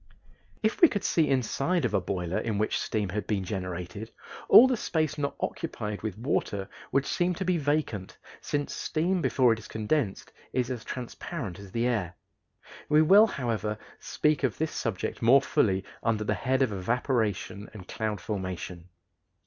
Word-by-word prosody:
If 215 - 0
we 340 - +10
could 205 -9 -3
see 160 -3 +2
inside 135 +6 +1
of - - -1
a - - +2
boiler 90 -1 -2
in 110 -3 -2
which 110 +1 0
steam 105 -3 -1
had 100 +1 -3
been 100 -3 0
generated, 90 +2 -5 0.4
all 240 - +10
the 260 - +1
space 155 -8 -1
not 140 -1 -2
occupied 105 -1 -4
with 105 -3 -4
water 105 -5 -1 0.2
would 140 0 +2
seem 175 0 0
to 190 - -3
be 180 -2 +2
vacant, 145 -10 -1 0.2
since 145 -1 -2
steam 175 +3 0
before 125 -6 +4
it 115 - -5
is 110 - -11
condensed 110 -1 -2 0.2
is 125 0 0
as 120 -3 -4
transparent 125 - -6
as 100 -2 -11
the 115 +3 0
air. 100 -8 -1 0.7
We 150 +1 +6
will, 200 +7 +7
however, 115 - -2 0.2
speak 150 -1 +1
of 135 -5 0
this 160 0 -1
subject 110 -6 -3
more 120 +4 +7
fully 95 -7 +1 0.2
under 110 -2 0
the 105 - 0
head 130 +7 +1
of 125 - 0
evaporation 110 -1 -1
and 95 -4 -11
cloud 110 -2 -3
formation. 90 -3 -5
115 Hz, 170 wpm, -28 LUFS, 100-145 Hz, 0.7 s, we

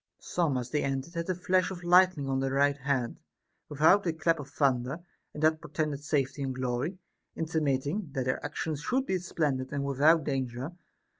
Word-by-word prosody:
Some 160 -7 0
as 125 0 -4
they 150 - +1
entered 135 +4 -2
had 170 +1 -3
a 185 - +1
flash 180 +1 +1
of 180 -2 -7
lightning 175 -4 +4
on 135 0 0
their 135 0 -1
right 140 +1 +3
hand, 135 -3 -2 0.5
without 160 +7 +4
a 165 - +1
clap 165 0 +1
of 140 -1 -7
thunder, 135 0 +1 0.3
and 150 - -6
that 155 0 +3
portended 150 -3 -3
safety 145 -2 -1
and 135 -2 -2
glory; 130 +7 -2 0.4
intimating 155 +2 -1
that 130 -3 -1
their 130 - -1
actions 155 -3 -3
should 260 - 0
be 190 -5 0
splendid 145 -7 -1
and 140 -1 -2
without 145 +4 +4
danger. 130 0 -3
145 Hz, 180 wpm, -29 LUFS, 135-165 Hz, 0.5 s, lightning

